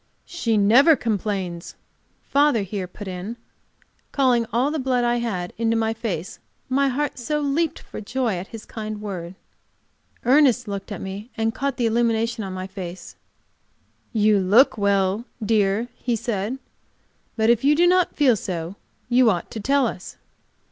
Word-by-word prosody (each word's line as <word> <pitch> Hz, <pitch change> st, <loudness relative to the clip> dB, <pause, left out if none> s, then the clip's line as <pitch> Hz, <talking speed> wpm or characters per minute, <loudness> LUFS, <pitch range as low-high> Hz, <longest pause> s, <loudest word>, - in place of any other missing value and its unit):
"She 230 Hz, -11 st, -1 dB
never 245 Hz, +11 st, +6 dB
complains," 195 Hz, -7 st, -3 dB, 0.5 s
father 285 Hz, -6 st, +2 dB
here 195 Hz, -1 st, -4 dB
put 200 Hz, +3 st, -10 dB
in, 190 Hz, +5 st, -6 dB, 0.7 s
calling 250 Hz, -4 st, +2 dB
all 255 Hz, +5 st, +1 dB
the 315 Hz, -, -2 dB
blood 255 Hz, -2 st, +1 dB
I 240 Hz, 0 st, +2 dB
had 195 Hz, -7 st, -3 dB
into 230 Hz, 0 st, +1 dB
my 225 Hz, 0 st, 0 dB
face, 220 Hz, -7 st, -5 dB, 0.3 s
my 275 Hz, +2 st, +2 dB
heart 275 Hz, +1 st, -2 dB
so 300 Hz, +5 st, -1 dB
leaped 295 Hz, +3 st, 0 dB
for -, -, -9 dB
joy 240 Hz, -1 st, -1 dB
at 180 Hz, +3 st, -6 dB
his 225 Hz, -2 st, -10 dB
kind 215 Hz, -1 st, -6 dB
word. 185 Hz, -4 st, -6 dB, 0.9 s
Ernest 255 Hz, -2 st, +4 dB
looked 200 Hz, +1 st, -5 dB
at 205 Hz, -, -5 dB
me 195 Hz, +4 st, -6 dB
and 225 Hz, 0 st, 0 dB
caught 275 Hz, +1 st, -2 dB
the 240 Hz, -, +1 dB
illumination 230 Hz, 0 st, +1 dB
of 190 Hz, -, -5 dB
my 185 Hz, 0 st, -5 dB
face. 185 Hz, -2 st, -8 dB, 1.0 s
"You 215 Hz, -2 st, +3 dB
look 205 Hz, +9 st, +5 dB
well, 200 Hz, +1 st, +1 dB, 0.2 s
dear," 210 Hz, +1 st, +2 dB
he 240 Hz, -2 st, -1 dB
said. 220 Hz, +2 st, -2 dB, 0.8 s
"But 220 Hz, 0 st, +3 dB
if 235 Hz, 0 st, +1 dB
you 290 Hz, +2 st, +5 dB
do 345 Hz, +3 st, +4 dB
not 360 Hz, 0 st, +3 dB
feel 270 Hz, -6 st, +4 dB
so 180 Hz, -1 st, -5 dB, 0.3 s
you 245 Hz, -1 st, +4 dB
ought 175 Hz, -5 st, -2 dB
to 225 Hz, -, -5 dB
tell 275 Hz, +5 st, +2 dB
us. 190 Hz, -5 st, -6 dB
225 Hz, 160 wpm, -23 LUFS, 200-255 Hz, 1.0 s, never